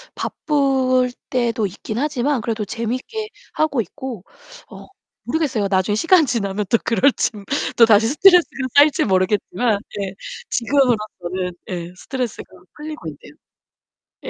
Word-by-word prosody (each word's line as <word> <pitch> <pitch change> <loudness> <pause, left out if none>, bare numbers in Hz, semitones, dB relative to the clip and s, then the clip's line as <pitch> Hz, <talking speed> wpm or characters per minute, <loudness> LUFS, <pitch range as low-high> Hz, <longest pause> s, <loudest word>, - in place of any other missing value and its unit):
바쁠 260 -4 +1 0.2
때도 235 -4 0
있긴 215 +3 -7
하지만 280 -2 0
그래도 220 -2 -2
재밌게 255 - -4 0.3
하고 295 -6 +1
있고. 240 - -7 0.5
어 - - -12 0.4
모르겠어요. 250 -8 -1
나중에 190 +2 +1
시간 330 - +4
지나면 210 -5 -2
또 230 - +4
그럴진. 230 -4 +1 0.3
또다시 225 -2 +6
스트레스가 310 -2 +4
쌓일지 290 +1 +5
모르겠지만 200 +3 +1 0.2
네 195 -2 -3 0.4
지금으로서는 215 -8 0 0.2
예 175 -1 -5
스트레스가 250 +2 -4 0.3
풀리고 305 +1 -8
있네요. - - -11 0.9
예. - - -4
235 Hz, 305 characters per minute, -20 LUFS, 205-280 Hz, 0.9 s, 또다시